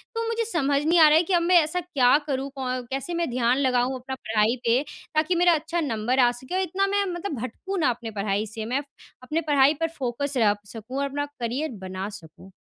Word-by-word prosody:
तो 460 - -1
मुझे 460 0 -1
समझ 285 -3 +1
नहीं 335 +2 +4
आ 315 - +9
रहा 305 - +6
है 330 - +4
कि 365 - -2
अब 345 - +4
मैं 355 +2 +3
ऐसा 315 +4 -1
क्या 285 -7 +3
करूँ 275 -1 -2
कौ 265 - -4 0.3
कैसे 270 +6 -2
मैं 340 -2 -1
ध्यान 245 0 +1
लगाऊँ 255 -1 +1
अपना 265 +1 -6
पढ़ाई 220 -1 +1
पे 235 +3 +3 0.3
ताकि 315 +4 +2
मेरा 350 0 +5
अच्छा 325 +3 -2
नंबर 245 -1 -1
आ 245 -1 +5
सके? 245 +2 -10
क्यों 370 +5 -1
इतना 380 +2 0
मैं 400 0 +1
मतलब 345 - -4
भटकूँ 380 - -5
ना 295 - +3
अपनी 235 -2 -4
पढ़ाई 205 0 -1
से 220 +1 -6
मैं 255 +5 -1
प - - -16 0.4
अपनी 305 +6 -1
पढ़ाई 280 0 +5
पर 325 - +2
फोकस 270 +2 -2
रख 205 -2 +2
सकूँ 230 +4 -7
और 280 - 0
अपना 285 +1 -2
करियर 250 +6 -2
बना 190 +2 -5
सकूँ। 180 0 -12
270 Hz, 230 wpm, -25 LUFS, 235-330 Hz, 0.4 s, आ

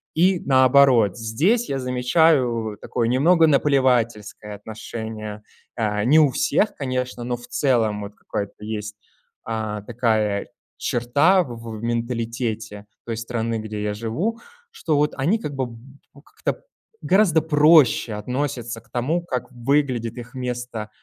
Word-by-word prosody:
И 180 +3 +3
наоборот, 130 -4 +5
здесь 155 - +1
я 135 - -1
замечаю 125 -3 +2
такое 115 -2 -1
немного 160 +7 +4
наплевательское 120 -7 +1
отношение, 110 0 -7 0.3
э, 105 -2 0
не 155 +5 +6
у 150 - +5
всех, 150 - +1
конечно, 125 -2 -3
но 120 0 -2
в 120 - -12
целом 115 -8 +1
вот 100 0 -8
какая-то 105 +1 -6
есть, 105 -1 -5 0.5
а, 110 -2 -3
такая 110 -3 0 0.3
черта 145 +10 +2
в 120 -5 -8 0.2
в - - -10
менталитете 115 -3 -3 0.2
той 115 - -3
страны, 115 -1 -2
где 110 -1 -5
я 105 0 -1
живу, 150 - -3 0.3
что 160 - -1
вот 150 +1 +1
они 165 +12 +1
как 150 -10 -5
бы 125 -3 -4 0.5
как-то - - -4 0.4
гораздо 185 -5 +3
проще 150 -7 +4
относятся 120 0 -3
к 115 - -29
тому, 150 +9 -1
как 125 -7 -4
выглядит 125 -2 0
их 120 0 -9
место 125 -4 -5
120 Hz, 130 wpm, -22 LUFS, 110-140 Hz, 0.5 s, не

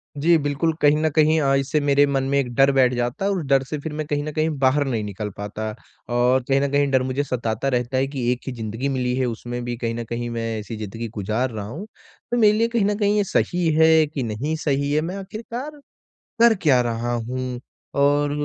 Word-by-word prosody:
जी 165 +4 +4
बिल्कुल, 145 +2 0
कहीं 145 +1 +5
न 155 0 +1
कहीं 155 0 +4
अ, 135 -1 +2
इससे 135 +3 +1
मेरे 145 0 +4
मन 135 -1 0
में 140 - +2
एक 125 -3 -2
डर 135 0 +5
बैठ 130 -2 +3
जाता 120 +9 -2
है 200 - +2
और 195 - 0
उस 160 - -4
डर 135 -1 +3
से 150 +3 -5
फिर 150 +1 -6
मैं 155 0 -3
कहीं 145 0 -1
न 155 - -4
कहीं 155 +1 +1
बाहर 140 +2 +3
नहीं 115 -4 -1
निकल 105 +1 -5
पाता 105 +2 -4 0.5
और 125 +1 +3
कहीं 135 0 +3
न 140 - 0
कहीं 145 0 +2
डर 130 -1 +3
मुझे 130 +2 -1
सताता 120 -2 -2
रहता 125 +2 -1
है 135 +1 +1
कि 125 -3 -1
एक 125 - -1
ही - - -2
ज़िंदगी 115 +3 -3
मिली 125 -2 -1
है, 130 0 0
उसमें 120 +1 -4
भी 120 0 -3
कहीं 115 -1 -2
न 120 - -4
कहीं 120 0 -3
मैं 115 -1 -3
ऐसी 105 +2 -7
ज़िंदगी 110 +2 -5
को 105 -1 -8
गुज़ार 110 +6 -1
रहा 105 -3 -5
हूँ, 160 - -7 0.5
तो 240 - +1
मेरे 210 -2 +5
लिए 230 - +3
कहीं 235 -4 +1
न 205 0 +1
कहीं 205 0 +2
ये 205 - +3
सही 180 -2 0
है 160 0 +5
कि 145 -4 -4
नहीं 120 +8 -2
सही 140 -1 0
है, 155 - +2
मैं 175 +4 -4
आख़िरकार 235 +9 -7 0.6
कर 235 0 +7
क्या 130 -6 +4
रहा 120 0 -2
हूँ 125 +1 -3 0.4
और 145 +1 +3
135 Hz, 245 wpm, -22 LUFS, 120-155 Hz, 0.6 s, कर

